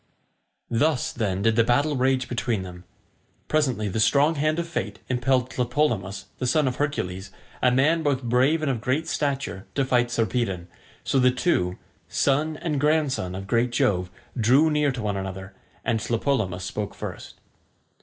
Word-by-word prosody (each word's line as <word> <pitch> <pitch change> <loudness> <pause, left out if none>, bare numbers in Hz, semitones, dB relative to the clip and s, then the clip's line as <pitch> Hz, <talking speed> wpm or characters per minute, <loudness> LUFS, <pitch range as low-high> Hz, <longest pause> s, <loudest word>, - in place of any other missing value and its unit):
Thus, 135 +3 +1
then, 100 -4 -1
did 115 -1 +3
the 115 - +5
battle 140 +6 +2
rage 130 0 +1
between 120 -4 -1
them. 90 0 -10 0.6
Presently 130 -9 +1
the 100 +3 -2
strong 145 +7 +4
hand 155 +1 0
of 170 0 -2
fate 105 -11 -3
impelled 130 0 +1
Tlepolemus, 120 -7 -1
the 125 - -1
son 145 +2 +3
of 125 - -2
Hercules, 95 -10 -2 0.3
a 125 - +5
man 150 +6 +3
both 140 -4 0
brave 130 +7 +2
and 140 - +1
of 120 -4 -3
great 140 +7 0
stature, 135 -9 -2
to 140 - +2
fight 120 -2 +2
Sarpedon; 115 -6 -1 0.4
so 135 - +1
the 125 0 +5
two, 110 - 0 0.3
son 150 +3 +1
and 150 -3 -2
grandson 145 - +1
of 95 +1 -6
great 120 +4 +1
Jove, 90 -6 +1 0.3
drew 130 +7 +4
near 150 -2 +2
to 125 -3 -5
one 100 -2 -1
another, 95 0 -6 0.3
and 115 0 +1
Tlepolemus 110 -6 -1
spoke 105 +1 -4
first. - - -7
125 Hz, 165 wpm, -25 LUFS, 105-145 Hz, 0.6 s, the